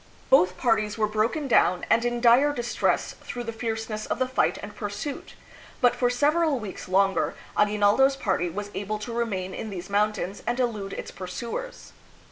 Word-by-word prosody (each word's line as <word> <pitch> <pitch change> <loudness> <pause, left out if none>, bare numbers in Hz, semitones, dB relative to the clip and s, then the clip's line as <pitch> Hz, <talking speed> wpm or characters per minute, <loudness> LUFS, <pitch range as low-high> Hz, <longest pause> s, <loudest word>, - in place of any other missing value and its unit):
Both 185 -8 +5
parties 220 -2 +1
were 215 - +2
broken 220 +8 0
down 180 -7 +3
and 230 - +3
in 240 0 -1
dire 250 +5 +6
distress 240 -2 0
through 245 - -6
the 230 -1 -5
fierceness 225 -1 -4
of - - -1
the 255 - 0
fight 260 - +1
and - - -8
pursuit, 210 +6 -5 0.4
but 245 -3 +4
for 245 - +2
several 295 +4 +2
weeks 210 -5 -7
longer 195 +1 +2 0.2
Agui 210 0 +2
naldo 205 +6 +5
's 275 - -3
party 190 -8 0
was 205 +4 -6
able 205 +2 -3
to 220 +3 -6
remain 195 -6 -2
in 220 - -5
these 185 -1 -7
mountains 205 -1 0
and 240 +1 0
elude 215 -6 -1
its - - -6
pursuers. 235 - -6
220 Hz, 180 wpm, -26 LUFS, 205-245 Hz, 0.4 s, dire